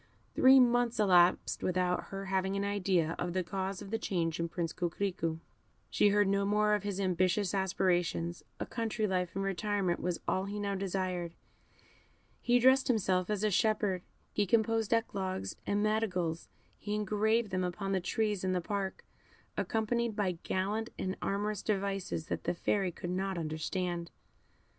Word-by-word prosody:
Three 265 +1 +7
months 245 -2 +3
elapsed 180 -3 +4
without 180 0 0
her 195 0 -6
having 190 0 0
an 200 - 0
idea 185 -5 +1
of 175 0 -2
the 185 0 0
cause 190 +2 -3
of 200 - -10
the 225 - 0
change 165 -6 -1
in 170 0 -1
Prince 170 -1 -3
Coquerico; 175 -2 -2 0.5
she 205 - +4
heard 205 0 +3
no 200 0 +2
more 210 +1 +2
of 210 - +2
his 200 -1 -3
ambitious 185 +1 +1
aspirations; 180 -3 0 0.2
a - - -2
country 225 -2 -2
life 180 -3 -1
and 195 - -1
retirement 195 -2 0
was 180 -1 -2
all 190 +1 +1
he 205 +1 -4
now 200 -1 -1
desired; 185 -3 -2 1.1
he 245 0 +4
dressed 260 +2 +5
himself 190 -6 +1
as 210 -1 -1
a 215 - +2
shepherd; 210 -3 +1 0.3
he 205 -1 +1
composed 225 +1 +2
eclogues 195 -5 -1
and 205 +1 +1
madrigals; 185 -7 -1 0.3
he 210 0 -3
engraved 210 +1 +1
them 185 0 0
upon 195 +2 -3
the 190 -1 +1
trees 210 +1 -1
in 185 0 +1
the 180 - +1
park, 195 +2 -3 0.5
accompanied 230 0 0
by 200 -3 +1
gallant 210 +4 -1
and 185 0 -2
amorous 205 0 -1
devices 195 -5 -2
that - - -4
the - - 0
Fairy 190 +1 0
could 175 +1 -6
not 190 0 -1
understand. 170 +2 -3
195 Hz, 160 wpm, -32 LUFS, 180-210 Hz, 1.1 s, Three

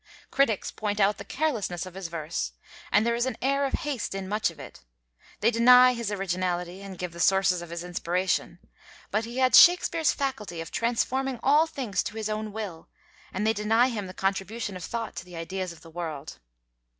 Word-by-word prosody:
Critics 270 -7 +1
point 210 -1 -3
out 200 0 +3
the - - -6
carelessness 220 - -2
of 185 - -10
his 190 -1 -5
verse, 165 -1 -4 0.4
and 210 - +4
there 235 - +2
is 240 +2 0
an 260 - -3
air 275 +2 +1
of 270 - -3
haste 265 -9 -3
in 195 -1 -4
much 210 +2 +1
of - - -14
it; - - -10 0.6
they 225 +3 +4
deny 250 +2 +7
his 235 -3 -3
originality 180 -2 -2
and 195 -2 -8
give 180 -1 -5
the 170 - -10
sources 185 -1 +3
of 175 - -9
his 170 0 -5
inspiration, 175 0 -1 0.5
but 215 +2 0
he 235 +2 -7
had 255 -2 +3
Shakespeare's 335 -1 +6
faculty 225 -11 -3
of 165 - -6
transforming 250 +2 0
all 300 +4 +5
things 260 -10 -2
to 210 - -6
his 215 -1 -2
own 215 0 -3
will; 200 -6 -6 0.4
and 210 +3 -2
they 220 - +3
deny 225 +4 +3
him 210 -5 -4
the 185 - -10
contribution 195 +2 -2
of 180 - -7
thought 230 +3 -4
to - - -4
the 180 -1 -12
ideas 185 +2 -4
of 165 -2 -13
the 165 - -14
world. 160 -4 -6
205 Hz, 200 wpm, -27 LUFS, 180-235 Hz, 0.6 s, deny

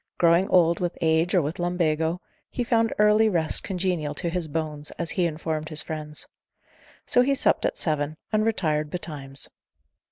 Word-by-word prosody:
Growing 170 +2 +4
old 170 -2 +4
with 175 -1 -2
age 165 +2 +2
or 175 - +4
with 150 +5 -4
lumbago, 170 -1 0 0.3
he 245 - -2
found 230 -1 +2
early 210 +1 +5
rest 165 -5 +1
congenial 180 -6 -2
to 170 +2 -1
his 175 -2 -2
bones, 150 -1 -4
as 170 -1 -2
he 180 - +1
informed 155 -1 -3
his 155 -2 -4
friends: 150 -1 -5 0.8
so 245 - +4
he 275 +2 +2
supped - - +2
at - - -1
seven, 155 -1 -1 0.2
and 215 0 +3
retired 155 -9 0
betimes. 145 -5 -5
170 Hz, 165 wpm, -25 LUFS, 155-185 Hz, 0.8 s, early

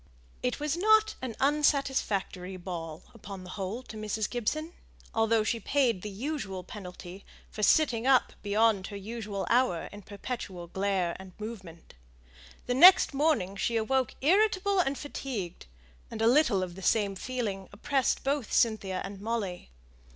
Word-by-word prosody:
It 250 +2 -1
was 300 0 -1
not 435 +4 +4
an 250 -4 -4
unsatisfactory 265 -10 +1
ball 170 -2 -6
upon 200 -4 -9
the 185 - -9
whole 205 +5 -4
to 230 - -11
Mrs. 215 0 -2
Gibson, 310 +8 -2 0.4
although 225 0 +3
she 230 +2 -1
paid 240 -4 +1
the 210 - -5
usual 200 -4 -4
penalty 180 -1 -9 0.3
for 215 - -6
sitting 245 0 +3
up 265 -2 +4
beyond 205 -1 +2
her 205 - -8
ordinary 210 -1 -5
hour 235 -9 +2
in 205 - -10
perpetual 200 -3 -6
glare 190 -1 -1
and 190 -1 -11
movement. 190 -7 -9 0.7
The 245 - 0
next 355 +5 +8
morning 275 - +1
she 230 +3 -1
awoke 255 +2 0
irritable 395 +4 +3
and 280 -6 +1
fatigued; 235 - -5 0.4
and 220 - -7
a 225 - +2
little 240 -6 +4
of 180 -1 -5
the 190 - -10
same 200 +1 +2
feeling 205 -4 -4
oppressed 265 +6 0
both 275 -3 -1
Cynthia 200 -5 +1
and 195 0 -8
Molly. 205 - -3
220 Hz, 150 wpm, -29 LUFS, 195-265 Hz, 0.7 s, next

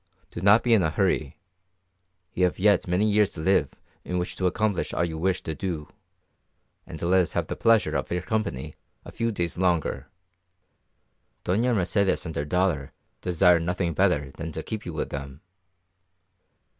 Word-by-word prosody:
Do - - -6
not 100 +4 +5
be 120 - +3
in 110 - +5
a 80 - +1
hurry; - - 0 1.0
you 90 - +2
have 90 - -1
yet 100 0 +3
many 90 +4 +2
years 105 -1 +3
to - - -8
live 95 +5 +2 0.3
in 90 - -3
which 90 0 -3
to 95 - +1
accomplish 105 +1 -1
all 85 - +1
you 80 -2 -5
wish 90 +3 -1
to 80 - -3
do, 80 -1 -4 1.0
and - - -8
let 90 +2 +3
us 90 - -3
have - - 0
the - - -5
pleasure 115 -2 +3
of - - -2
your 90 0 -1
company 100 - -3 0.3
a - - -9
few 115 0 -1
days 85 -4 -3
longer. 90 -4 0 1.4
Doña 115 +7 +1
Mercedes 95 0 +1
and 80 - -6
her 70 - -2
daughter 85 -4 0 0.3
desire 90 -1 +4
nothing 85 0 -1
better 75 -1 +1
than 80 0 -5
to 80 - -5
keep 110 -3 -6
you 85 - -5
with 75 - -3
them." 70 0 -7
90 Hz, 175 wpm, -26 LUFS, 80-100 Hz, 1.4 s, not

